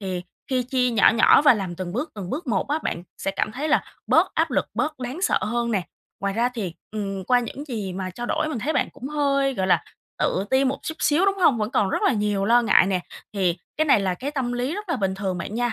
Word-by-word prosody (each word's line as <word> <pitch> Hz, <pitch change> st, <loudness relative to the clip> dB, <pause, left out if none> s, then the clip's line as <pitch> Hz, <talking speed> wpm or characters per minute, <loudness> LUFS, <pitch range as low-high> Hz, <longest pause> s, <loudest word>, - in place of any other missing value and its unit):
Thì 185 Hz, -3 st, -3 dB, 0.3 s
khi 255 Hz, -1 st, +2 dB
chia 250 Hz, 0 st, +1 dB
nhỏ 225 Hz, -3 st, +5 dB
nhỏ 235 Hz, -, +6 dB
và 290 Hz, -4 st, +7 dB
làm 190 Hz, -5 st, -4 dB
từng 180 Hz, -1 st, -5 dB
bước, 270 Hz, -, -3 dB
từng 195 Hz, -4 st, -6 dB
bước 310 Hz, +5 st, -4 dB
một 215 Hz, -3 st, 0 dB
á 295 Hz, +2 st, +1 dB
bạn 170 Hz, -, -3 dB, 0.2 s
sẽ 195 Hz, -, -1 dB
cảm 195 Hz, +2 st, -2 dB
thấy 285 Hz, +6 st, -3 dB
là 300 Hz, -, +3 dB, 0.2 s
bớt -, -, +3 dB
áp -, -, +1 dB
lực, -, -, 0 dB
bớt 310 Hz, -3 st, -1 dB
đáng 255 Hz, +9 st, -5 dB
sợ -, -, +3 dB
hơn 235 Hz, +2 st, -1 dB
nè. 200 Hz, -5 st, +1 dB, 0.4 s
Ngoài 200 Hz, 0 st, -1 dB
ra 235 Hz, +2 st, +2 dB
thì, 205 Hz, -9 st, -5 dB, 0.2 s
ừm, 195 Hz, -3 st, -4 dB
qua 250 Hz, +3 st, +3 dB
những 255 Hz, +4 st, -6 dB
gì 210 Hz, -7 st, -4 dB
mà 185 Hz, 0 st, -4 dB
trao 240 Hz, +7 st, -6 dB
đổi 310 Hz, -, 0 dB
mình 300 Hz, -, -3 dB
thấy 290 Hz, +8 st, -1 dB
bạn -, -, +1 dB
cũng 270 Hz, -1 st, -8 dB
hơi, 275 Hz, -2 st, +1 dB
gọi 190 Hz, -4 st, -1 dB
là, 185 Hz, -, +3 dB, 0.3 s
tự 190 Hz, -, 0 dB
ti 265 Hz, +1 st, +3 dB
một 270 Hz, +1 st, 0 dB
chút 315 Hz, -, -4 dB
xíu, 315 Hz, +6 st, +3 dB
đúng 395 Hz, 0 st, +2 dB
hông? 300 Hz, -10 st, +4 dB
Vẫn 215 Hz, 0 st, -1 dB
còn 205 Hz, -5 st, +2 dB
rất -, -, -1 dB
là -, -, +4 dB
nhiều 205 Hz, -2 st, 0 dB
lo 240 Hz, +3 st, +5 dB
ngại 210 Hz, -, +5 dB
nè, 190 Hz, -2 st, 0 dB, 0.3 s
thì 185 Hz, -4 st, +1 dB, 0.2 s
cái 310 Hz, -, +2 dB
này 275 Hz, -8 st, +4 dB
là 190 Hz, -2 st, 0 dB
cái 265 Hz, +10 st, -4 dB
tâm 265 Hz, -4 st, -2 dB
lý 250 Hz, +6 st, -2 dB
rất 415 Hz, -1 st, -6 dB
là 335 Hz, -, 0 dB
bình 195 Hz, -4 st, -1 dB
thường 190 Hz, -2 st, -3 dB
bạn 200 Hz, -, -5 dB
nha, 240 Hz, 0 st, 0 dB
235 Hz, 270 wpm, -24 LUFS, 195-275 Hz, 0.4 s, và